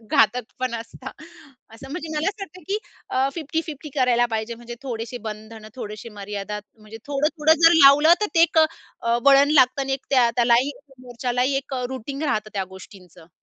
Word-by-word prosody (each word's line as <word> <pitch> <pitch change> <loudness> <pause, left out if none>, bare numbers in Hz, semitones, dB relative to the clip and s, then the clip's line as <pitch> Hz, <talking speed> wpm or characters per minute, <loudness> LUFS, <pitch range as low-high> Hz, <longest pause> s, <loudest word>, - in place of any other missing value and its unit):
घातक 240 +3 +3
पण 255 -2 -2
असतात. 230 0 -8 0.6
असं 270 +4 -12
म्हणजे 325 +1 -5
मला 310 +5 +1
असं 400 0 -6
वाटतं 370 -1 -10
की 410 +2 0 0.3
अ, 265 +1 +1
50-50 310 -2 -5
करायला 245 -2 +3
पाहिजे, 220 +2 -3
म्हणजे 240 +1 -9
थोडेसे 240 -2 -5
बंधन 215 +1 -9
थोडेसे 215 -2 -7
मर्यादा. 205 +1 -5 0.2
म्हणजे 215 +1 -11
थोडं, 290 +1 0
थोडं 315 +1 +4
जर 330 - +8
लावलं, 295 +4 +7
तर 420 - +1
ते 330 - +5
एक 335 -1 +3
अ, 315 - +6 0.6
वळण 280 +1 +6
लागतं 260 -1 +4
आणि 270 0 -1
त्या 250 -4 +4
त्यालाही 240 +3 +3 0.3
मोर्चालाही 250 +2 -2
एक 270 0 -4
अ, 250 -1 -3
रुटीग 275 +3 -6
राहतं 215 -8 -1
त्या 195 -1 -1
गोष्टींचं. 180 -4 -15
255 Hz, 175 wpm, -23 LUFS, 225-290 Hz, 0.6 s, जर